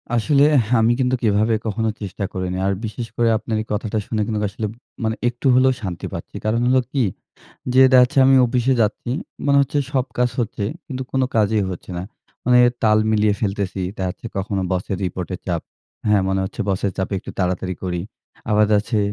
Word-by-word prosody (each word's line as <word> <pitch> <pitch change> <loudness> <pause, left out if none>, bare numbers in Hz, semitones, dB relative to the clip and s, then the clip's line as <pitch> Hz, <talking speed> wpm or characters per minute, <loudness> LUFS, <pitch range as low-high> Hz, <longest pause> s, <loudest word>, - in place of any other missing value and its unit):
আসলেহ 140 +5 +4 0.3
আমি 115 +2 +4
কিন্তু 130 0 +2
কিভাবে 110 +1 +2
কখনো 110 +1 -1
চেষ্টা 100 0 -4
করিনি। 95 0 -3
আর 100 - +2
বিশেষ 115 +2 -5
করে 120 -1 +2
আপনার 110 - -4
এই 110 - -7
কথাটা 110 +1 -2
শুনে 110 -2 -1
কিন্তু 110 0 -2
আসলে 110 +1 -4 0.4
মানে 110 0 0
একটু 120 +3 -3
হলেও 130 +1 +5
শান্তি 90 -4 -5
পাচ্ছি। - - -7
কারণ 110 +2 +1
হলো 130 +1 +4
কি 135 -3 +1 0.7
যে 130 - +6
দেখা 130 - +8
যাচ্ছে 135 +3 +1
আমি 135 - +6
অফিসে 125 +2 +1
যাচ্ছি। 110 +3 -2 0.4
মনে 140 0 +4
হচ্ছে 140 +1 0
সব 130 -3 +2
কাজ 125 0 +3
হচ্ছে, 105 -2 -2 0.2
কিন্তু 130 -3 -4
কোন 135 - 0 0.2
কাজই 105 -1 +3
হচ্ছে 90 +1 -8
না। - - -3 0.4
মানে 125 0 +5 0.2
তাল 110 -1 +4
মিলিয়ে 105 -1 +3
ফেলতেছি। 100 -2 -2 0.2
দেখা 95 -1 -2
যাচ্ছে 90 - -7
কখনো 95 0 -1
বসের 95 +1 -2
রিপোর্ট 90 0 -4
এর - - -7
চাপ। 85 -3 -1 0.5
হ্যাঁ? 105 -2 +4
মনে 95 0 +1
হচ্ছে 95 - -6
বসের 95 0 0
চাপে 95 +1 -2
একটু - - -9
তাড়াতাড়ি 90 0 -1
করি। 90 -2 -2 0.5
আবার 105 0 +5
দেখা - - +1
যাচ্ছে 110 +2 -1
110 Hz, 195 wpm, -21 LUFS, 95-120 Hz, 0.7 s, দেখা